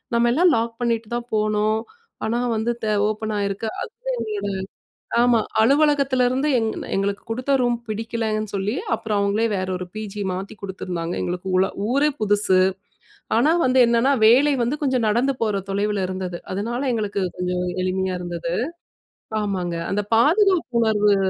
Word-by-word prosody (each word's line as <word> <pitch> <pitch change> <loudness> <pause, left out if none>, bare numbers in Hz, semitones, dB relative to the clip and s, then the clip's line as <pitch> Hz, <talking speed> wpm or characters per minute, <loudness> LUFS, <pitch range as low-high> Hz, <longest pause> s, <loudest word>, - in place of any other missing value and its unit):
"நம்ம 235 0 +3
எல்லாம் 340 +3 +4
லாக் 230 0 -3
பண்ணிட்டு 230 -2 0
தான் 240 0 -7
போனோம். 215 0 +1 0.5
ஆனா 225 +2 0 0.2
வந்து, 230 +2 0
த - - 0 0.2
ஓப்பன் 215 0 -3
ஆகிருக்கு." 200 +2 -2 0.2
அந்த - - -8 0.5
ஒரு 205 - -2 0.7
ஆமா 240 -1 +4 0.2
அலுவலகத்திலருந்து 275 0 +3
எங், 225 -1 0 0.3
எங்களுக்கு 200 +1 -1
கொடுத்த 255 +4 -1
ரூம் 240 -1 +2
பிடிக்கலன்னு 215 -1 -2
சொல்லி, 200 +4 -1 0.2
அப்புறம் 215 -2 -2
அவங்களே 200 +3 +1
வேற 185 -1 -1
ஒரு, 180 - -5
பிஜி 210 -1 -5
மாத்தி 190 +4 -5
குடுத்துருந்தாங்க. 180 -3 -4
எங்களுக்கு 180 +1 -4
ஊள 190 +1 +3 0.2
ஊரே 280 +4 +3
புதுசு. 205 -2 +3 0.8
ஆனா 290 +8 +4
வந்து 260 0 +4
என்னென்னா 235 +4 +3
வேலை 275 +6 +5
வந்து, 250 +6 -1
கொஞ்சம் 255 -5 +1
நடந்து 245 +6 +2
போற 205 -3 0
தொலைவில 200 0 0
இருந்தது. 185 -2 -4
அதனால, 230 +6 -2
எங்களுக்கு 205 -3 -2 0.2
கொஞ்சம் 180 0 -1 0.2
எளிமையா 185 0 -1
இருந்தது. 170 -1 -4 0.9
ஆமாங்க, 185 -4 -2 0.2
அந்த 210 +1 0
பாதுகாப்பு 335 - +3
உணர்வு. 210 -2 +3
215 Hz, 145 wpm, -22 LUFS, 195-245 Hz, 0.9 s, வேலை